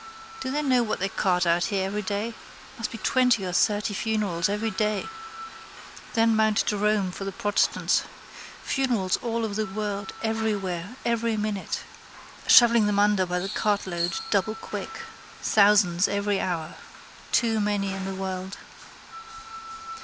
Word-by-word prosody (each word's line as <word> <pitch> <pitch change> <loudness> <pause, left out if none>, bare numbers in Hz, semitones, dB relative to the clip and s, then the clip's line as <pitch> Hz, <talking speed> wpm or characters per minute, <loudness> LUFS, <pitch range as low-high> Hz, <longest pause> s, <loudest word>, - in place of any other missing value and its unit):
Do 260 - -4
they 295 +3 -1
know 255 -3 +3
what 220 -2 -1
they 195 +1 -1
cart 180 -2 +1
out 170 +1 +2
here 195 -3 -1
every 205 +2 -2
day? 205 +3 -3 0.5
Must 230 - -2
be 230 - -7
twenty 250 -5 +2
or 180 - -3
thirty 210 +2 +1
funerals 200 -5 0
every 215 +2 -1
day. 215 -2 -1 1.1
Then 225 -1 +4
Mount 220 -1 +2
Jerome 210 -2 +1
for 195 - -7
the 195 - -3
protestants. 205 +2 +1 0.6
Funerals 240 -9 0
all 230 -1 -2
over 210 - -4
the 215 0 -1
world 200 -1 -3
everywhere 210 -3 -2
every 230 -1 0
minute. 210 -2 -3 0.7
Shovelling 235 -3 +7
them 205 -1 0
under 205 -2 +3
by 180 0 -1
the 185 +2 -3
cartload 190 -5 -1 0.2
doublequick. 220 +2 -2 0.4
Thousands 200 -4 +4
every 200 0 0
hour. 165 -4 -3 0.5
Too 225 -2 +2
many 205 -2 0
in 195 0 -5
the 195 0 -4
world. 190 0 -5
205 Hz, 140 wpm, -26 LUFS, 190-220 Hz, 1.1 s, Shovelling